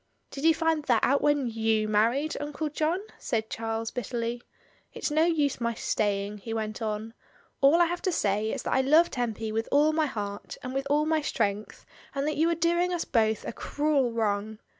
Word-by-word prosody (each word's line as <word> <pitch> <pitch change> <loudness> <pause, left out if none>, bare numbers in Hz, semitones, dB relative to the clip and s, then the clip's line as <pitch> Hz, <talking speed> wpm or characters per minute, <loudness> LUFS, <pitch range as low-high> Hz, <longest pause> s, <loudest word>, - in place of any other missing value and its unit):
"Did 280 +2 -5
you 325 -1 +6
find 325 -2 +1
that 240 -5 +2
out 280 +2 +3
when 290 -5 +2
j^ou 220 -1 +1
married, 230 +8 +1
Uncle 295 +1 -3
John?" 315 +5 0 0.2
said 220 -1 -2
Charles 225 0 -3
bitterly. 240 0 -3 0.5
"It's - - -3
no 310 +2 +3
use 295 -6 +1
my 235 0 0
stay 205 -2 0
ing," 205 +1 -8
he 225 +2 -5
went 215 0 -4
on. 220 +1 -3 0.5
"All 280 +3 +6
I 345 - +6
have 350 +1 -3
to 370 - 0
say 210 - 0
is - - -4
that - - -1
I 265 - +4
love 310 +6 +4
Tempy 225 -3 -2
with 225 +1 -2
all 300 +2 +4
my 310 -1 +2
heart, 205 -5 -5
and 255 - -5
with 270 +1 -2
all 295 +1 +3
my 315 0 +1
strength, 210 -6 -2 0.3
and 275 0 -1
that 305 - -1
you 325 +2 +3
are 335 - +1
doing 345 +2 +1
us 350 -2 -1
both 220 -3 +1
a - - -4
cruel 290 -3 0
wrong. 215 -1 -1
250 Hz, 205 wpm, -27 LUFS, 220-305 Hz, 0.5 s, you